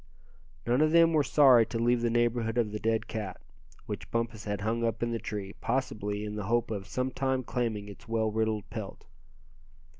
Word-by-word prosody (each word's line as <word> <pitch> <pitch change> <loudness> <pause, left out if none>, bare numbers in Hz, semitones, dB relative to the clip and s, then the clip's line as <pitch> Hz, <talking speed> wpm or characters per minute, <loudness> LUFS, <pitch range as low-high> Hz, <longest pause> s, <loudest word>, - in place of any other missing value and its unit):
None 125 +4 +2
of 155 - +4
them 165 0 +6
were 155 - +4
sorry 130 -1 +6
to 115 - -3
leave 120 +1 +2
the 120 - +1
neighborhood 120 0 +1
of 115 -3 +1
the 105 - -4
dead 110 0 0
cat, 105 -5 -5 0.5
which - - -6
Bumpus 115 -2 -2
had 105 -1 -3
hung 115 +2 -1
up 115 0 -1
in 120 - 0
the 115 - -2
tree, 105 -3 -5
possibly 105 -5 -2
in 105 0 -5
the 105 -2 -4
hope 120 +2 +1
of 100 -3 -4
sometime 130 0 -1
claiming 115 -4 -2
its 100 +1 -12
well 110 -1 0
riddled 110 -1 -1
pelt. 110 -3 -7
115 Hz, 190 wpm, -29 LUFS, 105-120 Hz, 0.5 s, them